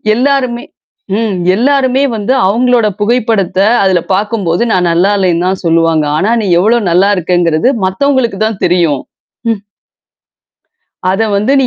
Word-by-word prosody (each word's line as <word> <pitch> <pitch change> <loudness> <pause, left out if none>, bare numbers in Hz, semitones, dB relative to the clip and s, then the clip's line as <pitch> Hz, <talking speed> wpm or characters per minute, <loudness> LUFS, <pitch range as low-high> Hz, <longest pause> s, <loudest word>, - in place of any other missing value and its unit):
எல்லாருமே 255 -1 0 0.5
ம். 220 -4 -1 0.2
எல்லாருமே 265 +2 +1
வந்து, 215 +4 -1
அவுங்களோட 235 +2 +2
புகைப்படத்த 210 -5 0 0.2
அதுல 185 -3 +2
பாக்கும்போது, 200 -2 -1
நான் 180 -1 +1
நல்லா 180 +4 +2
இல்லன்னு 180 -2 0
தான் 190 0 -1
சொல்லுவாங்க. 165 -2 +2
ஆனா, 195 +7 0
நீ - - -3
எவ்ளோ 225 +5 +2
நல்லா 190 +4 +3
இருக்கங்கறது 175 +2 0 0.2
மத்தவங்களுக்கு 240 +1 0
தான் 220 -3 -4
தெரியும். 170 -6 +1 0.5
ம். 210 - -4 1.5
அத 190 +3 0 0.2
வந்து, 210 +7 0
நீ 260 - +1
200 Hz, 130 wpm, -11 LUFS, 180-240 Hz, 1.5 s, நல்லா